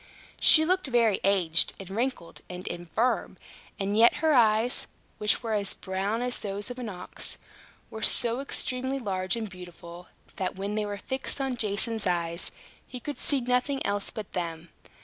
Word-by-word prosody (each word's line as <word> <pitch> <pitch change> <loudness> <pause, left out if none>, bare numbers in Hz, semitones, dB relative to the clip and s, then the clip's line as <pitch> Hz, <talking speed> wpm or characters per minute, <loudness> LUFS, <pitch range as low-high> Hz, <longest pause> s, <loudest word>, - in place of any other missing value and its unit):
She 315 -1 +7
looked 370 -1 +1
very 235 -5 +3
aged, 180 -5 +3
and 190 -1 -9
wrinkled, 230 -4 -3
and 180 0 -7
infirm; 175 +8 -1 0.4
and 200 +1 -1
yet 230 +2 +6
her 315 0 +2
eyes, 225 -1 +4 0.3
which 210 +3 +2
were 225 -1 -1
as 200 -2 +1
brown 200 +5 -2
as 250 0 0
those 205 +3 -4
of 245 - -7
an 240 -3 -4
ox, 180 -3 -5 0.5
were 220 - -7
so 235 +2 +2
extremely 260 -1 -1
large 190 -5 -1
and 225 -2 -3
beautiful, 175 -1 -11 0.3
that, 185 -1 -2
when 200 +2 -3
they 210 -1 -1
were 205 0 -4
fixed 265 +7 -3
on 270 -2 -1
Jason's 220 -1 +1
eyes, 170 -1 0 0.4
he 250 - -7
could 290 +4 -6
see 280 -3 +2
nothing 250 +3 +1
else 200 0 -1
but 215 -3 -7
them. 170 -2 -4
210 Hz, 170 wpm, -28 LUFS, 185-250 Hz, 0.5 s, She